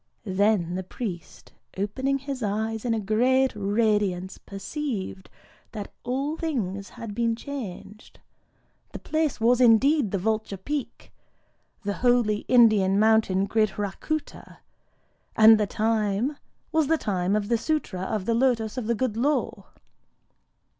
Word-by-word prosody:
Then 195 -3 +1
the 185 - -2
priest, 185 -3 -7 0.2
opening 260 +8 -1
his 275 -1 -6
eyes 220 +2 -2
in 230 -2 +1
a - - -1
great 250 +6 +2
radiance, 205 -3 0
perceived 200 -3 -5 0.4
that 210 -3 -7
all 275 +5 -2
things 200 - -3
had 230 -4 -8
been 230 +1 0
changed: 220 -6 -8 0.7
the - - -5
place 310 -4 -1
was 240 +2 +3
indeed 250 +2 +4
the 195 - -1
Vulture 215 +1 -2
Peak,—the 230 -3 -8
holy 240 -3 +1
Indian 215 -6 +5
mountain 215 -3 +3
Gridhrakûta; 215 +8 -2 0.8
and 220 0 +7
the 210 - +1
time 220 +5 0 0.4
was 315 -3 +2
the 325 +2 +3
time 190 -5 -1
of 210 -1 -1
the 235 - 0
Sûtra 225 - -2
of 200 0 -3
the 230 - +1
Lotos 235 -1 +1
of 225 - -5
the 235 - +1
Good 235 -1 -1
Law. 285 +6 -1
220 Hz, 125 wpm, -25 LUFS, 200-255 Hz, 0.8 s, and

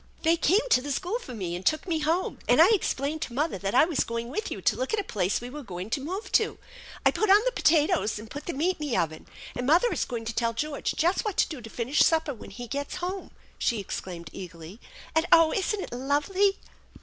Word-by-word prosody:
" - - -28
They 330 0 +4
came 390 +9 +2
to 250 - +5
the 285 +2 -4
school 370 - -1
for 255 - -9
me, 180 -5 -3
and 180 - -6
took 310 - +1
me 325 -3 0
home; 325 +4 0
and - - +5
I 335 +5 +8
explained 310 -7 0
to 245 - -4
mother 295 - 0
that 195 +4 -2
I 260 - +7
was 325 -4 0
going 230 0 -4
with 375 - -3
you - - -5
to - - +2
look 255 - -3
at - - -2
a - - -1
place 195 - 0
we 245 +1 -8
were 295 +2 -7
going 185 -3 -7
to 280 - 0
move 370 +9 -5
to. 440 - +2 0.5
I - - +6
put 430 - 0
on 400 +2 +8
the - - +2
potatoes, 310 - +2
and 215 +2 -8
put 290 +6 -8
the 345 - -2
meat 345 +7 0
in 300 - -3
the 240 - 0
oven, 160 -1 -2 0.3
and 245 0 -3
mother 345 - +4
is - - -1
going 235 -3 -5
to 230 - -3
tell 230 +1 0
George 290 +5 -2
just 345 +4 +2
what 420 -5 -3
to - - +4
do 300 -6 -7
to 225 - -9
finish 245 +6 -1
supper 320 -3 +2
when 235 - -11
he 245 - -8
gets 280 +3 -4
home," 370 +2 -4 0.3
she 230 - +1
exclaimed 180 -3 -6
eagerly. 170 +2 -9 0.3
"And, 320 +2 +2
oh, 330 -1 +6
isn't 405 +2 0
it - - -7
lovely 295 +10 +1
290 Hz, 255 wpm, -27 LUFS, 230-350 Hz, 0.5 s, I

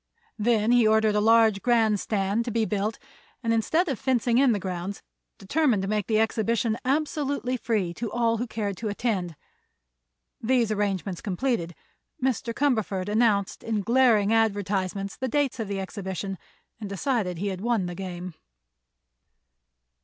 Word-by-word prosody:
Then 220 0 +2
he 240 -2 +5
ordered 220 0 +3
a 210 - +2
large 220 -2 +4
grand 225 -4 +3
stand 200 +2 0
to - - -2
be 225 -1 +1
built 210 +1 -1 0.5
and 230 0 +1
instead 315 - +1
of 270 -6 -2
fencing 250 -3 +2
in 270 -2 +5
the 215 - +1
grounds 185 +1 -5 0.3
determined 230 0 +1
to - - -2
make 210 -1 -1
the 220 -1 +2
exhibition 225 +1 +1
absolutely 280 -2 -1
free 215 -8 -1
to 225 +4 -5
all 230 -1 +1
who 240 +3 -3
cared 205 -4 -3
to 230 - -4
attend. 205 -6 -2 1.1
These 235 -1 +2
arrangements 200 -3 -2
completed, 185 -4 -2 0.4
Mr. 255 -2 -1
Cumberford 220 -8 0
announced 210 -3 +1
in 220 -2 -1
glaring 230 -2 +4
advertisements 200 -3 0
the 260 - -3
date 275 -1 0
of 220 - -2
the 200 -1 -3
exhibition, 190 -1 -5 0.4
and 210 -3 -6
decided 200 -3 -1
he 200 +4 -2
had 190 -1 -5
won 230 -4 +1
the 175 - -4
game. 180 -1 -6
220 Hz, 155 wpm, -26 LUFS, 195-240 Hz, 1.1 s, he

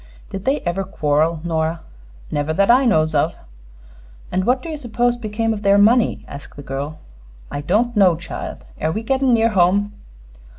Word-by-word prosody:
"Did 195 0 -6
they 275 +3 +1
ever 175 +3 -2
quarrel, 155 -1 0
Nora?" 165 -1 -1 0.5
"Never 145 +2 -1
that 200 +5 +4
I 260 +2 +5
knows 155 -9 +2
of." 155 +3 +1 1.0
"And 185 +1 0
what 255 +1 +1
do 335 - -6
you 315 - -3
suppose 240 -2 0
became 225 -1 -2
of 210 - -5
their 200 0 +4
money?" 225 +4 +3
asked 140 - -10
the 145 - -9
girl. 140 +3 -5 0.5
"I 145 - -3
don't 220 +10 +1
know, 190 -5 +5
child. 160 - -7
Air 160 - 0
we 220 +6 -3
gettin' 265 +2 +1
near 225 0 +3
home?" 200 +1 +2
195 Hz, 175 wpm, -20 LUFS, 160-230 Hz, 1.0 s, I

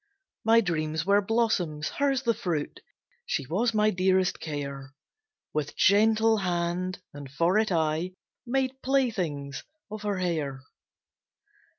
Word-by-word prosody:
My 225 +1 +5
dreams 160 -4 -1
were 200 +1 +4
blossoms, 195 -9 0
hers 275 -2 0
the 235 -2 +2
fruit, 175 -9 -3 0.4
She 140 - -2
was 205 - +1
my 215 0 +4
dearest 185 0 +2
care; 140 -2 -6 0.6
With 150 -1 -2
gentle 220 +2 +4
hand, 180 0 -1 0.2
and 145 -1 -9
for 170 +8 +2
it, 220 -2 0
I 160 +2 0 0.3
Made 265 +1 -1
playthings 185 - -1 0.3
of 215 0 -6
her 205 -2 -1
hair. 155 -7 -2
185 Hz, 120 wpm, -27 LUFS, 155-220 Hz, 0.6 s, My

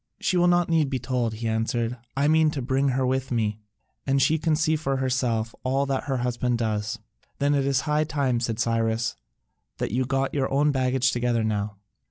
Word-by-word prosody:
"She 185 - 0
will 175 0 +4
not 175 -1 +3
need 165 -2 +3
to - - -5
be 130 - -1
told," 120 -2 -1
he 115 +1 -4
answered, 115 +2 -1 0.2
"I 140 +1 +3
mean 160 0 +4
to 150 -3 -3
bring 135 +2 +1
her 130 0 +1
with 130 +1 -1
me, 110 -3 0 0.5
and 135 0 +3
she 155 +4 +3
can 160 0 +1
see 160 0 +2
for 135 -3 -1
herself 125 -4 0
all 135 +2 +1
that 135 -1 -2
her 135 -2 -1
husband 125 0 0
does." 110 -1 -2 0.4
"Then 145 +1 +2
it 140 -1 +1
is 135 -1 +2
high 150 +1 +1
time," 140 -6 0
said 115 -2 -2
Cyrus, 115 0 0 0.6
"that - - -2
you 130 +4 0
got 135 0 0
your 135 -2 0
own 145 +2 +3
baggage 130 -1 +1
together 120 -2 0
now." 105 -1 -2
130 Hz, 210 wpm, -25 LUFS, 115-140 Hz, 0.6 s, will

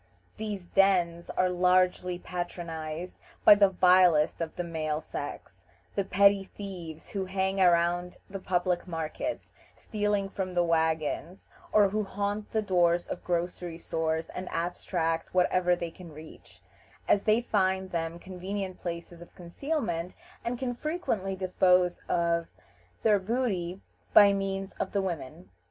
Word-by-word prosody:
These 210 -4 -4
dens 175 -2 +2
are 185 - +1
largely 180 0 +2
patronized 175 -2 -5 0.3
by - - +11
the 200 -1 +5
vilest 180 -4 +4
of 165 -1 -4
the 175 - -2
male 155 -3 -2
sex; - - -7 0.3
the 200 - 0
petty 200 +1 +4
thieves 180 -6 -8
who 195 -2 -2
hang 190 +1 0
around 175 0 +3
the 195 0 -6
public 180 -1 0
markets, 165 - -4 0.2
stealing 205 -2 -1
from 190 -2 -4
the 175 - +4
wagons, 160 +2 -1 0.2
or 205 -2 +5
who 215 +2 -1
haunt 205 +1 -3
the 220 -1 0
doors 175 -3 +2
of - - -6
grocery 175 -1 -2
stores 160 -1 -2
and 180 0 -6
abstract 165 -1 -2
whatever 180 0 +3
they 170 -1 -5
can 170 -1 -12
reach; 155 +1 -14 0.4
as 200 - +4
they 215 +2 +3
find 190 -5 0
them 165 0 -2
convenient 185 +1 -5
places 170 0 -6
of 175 - -14
concealment, 180 - -3 0.3
and 240 +1 -2
can 245 0 -2
frequently 240 - -2
dispose 180 -1 +2
of 170 -1 +1 0.6
their 210 -2 +4
booty 195 -4 -2 0.3
by 200 -1 +9
means 195 0 -2
of - - -3
the 200 - +2
women. 170 -2 -6
180 Hz, 140 wpm, -29 LUFS, 170-195 Hz, 0.6 s, by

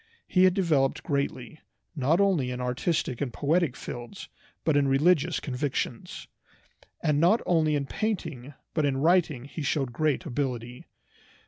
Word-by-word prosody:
He 185 0 +4
had 185 -1 +4
developed 155 -9 +1
greatly, 140 0 -3 0.4
not 150 +5 +2
only 185 -10 +2
in 125 0 -4
artistic 125 +1 -1
and 135 -4 -1
poetic 150 +1 +1
fields, 120 +11 -8 0.3
but 160 - +2
in 145 -1 +3
religious 145 +4 +3
convictions. 125 -3 -4 0.8
And 150 -2 +2
not 180 +8 +4
only 155 -3 +2
in 140 -1 -1
painting 155 - -4 0.2
but 155 - +1
in 140 -2 +1
writing 160 -4 +2
he 150 +3 -7
showed 135 -4 -1
great 155 +5 0
ability. 125 -4 -4
145 Hz, 140 wpm, -27 LUFS, 130-165 Hz, 0.8 s, He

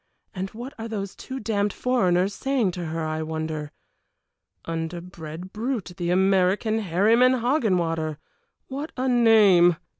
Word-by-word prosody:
And 190 -1 -4
what 245 +7 -8
are 225 - -4
those 200 -3 -5
two 265 0 -7
damned 205 -2 0
foreigners 190 -7 +1
saying 260 -5 0
to 175 -1 -5
her, 160 0 -3
I 155 0 -2
wonder. 155 -1 -4 0.9
Underbred 165 +1 -6
brute, 220 -4 -3
the 175 -2 -2
American, 190 +4 +2
Herryman 220 +7 +4
Hoggenwater! 175 - 0 0.5
What 285 +4 -5
a 260 +1 0
name! 215 -8 +6
190 Hz, 125 wpm, -24 LUFS, 170-230 Hz, 0.9 s, name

